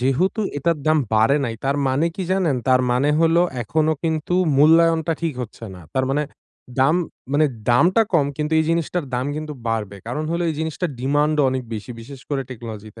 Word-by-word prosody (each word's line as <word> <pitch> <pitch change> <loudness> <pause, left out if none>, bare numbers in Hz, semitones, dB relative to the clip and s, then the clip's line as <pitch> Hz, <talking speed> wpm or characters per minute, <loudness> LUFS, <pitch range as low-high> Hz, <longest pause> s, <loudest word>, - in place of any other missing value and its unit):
যেহেতু 155 - +1 0.2
এটার 165 +2 0
দাম 155 0 +4 0.2
বাড়ে 110 +7 +4
নাই। 115 -3 -3
তার 140 +1 +1
মানে 140 +6 +1
কি 190 - -2
জানেন? 175 -8 +1
তার 130 0 +5
মানে 130 +4 +2
হলো 165 +1 +4 0.2
এখনো 155 +7 +1
কিন্তু 160 +2 -1 0.2
মূল্যায়নটা 165 +2 +4
ঠিক 165 - 0
হচ্ছে 115 0 -9
না। 90 - -11 0.2
তার 130 - +2
মানে 145 +2 +1 0.6
দাম 140 +4 +4 0.4
মানে 150 +1 +4 0.2
দামটা 175 - +4
কম, 150 -5 +3
কিন্তু 150 +1 -2
এই 160 - +2
জিনিসটার 170 0 -1
দাম 125 +2 -1
কিন্তু 155 0 -5 0.2
বাড়বে। 105 -3 -2
কারণ 150 +6 -3
হইলো 170 +1 -1
এই 155 - -3
জিনিসটার 160 +1 -2
ডিমান্ডও 145 +3 +2
অনেক 130 0 -2
বেশি, 110 +3 -7
বিশেষ 135 +3 -11
করে 135 -1 0
টেকনোলজিতে। 110 -3 -9
150 Hz, 185 wpm, -21 LUFS, 130-165 Hz, 0.6 s, তার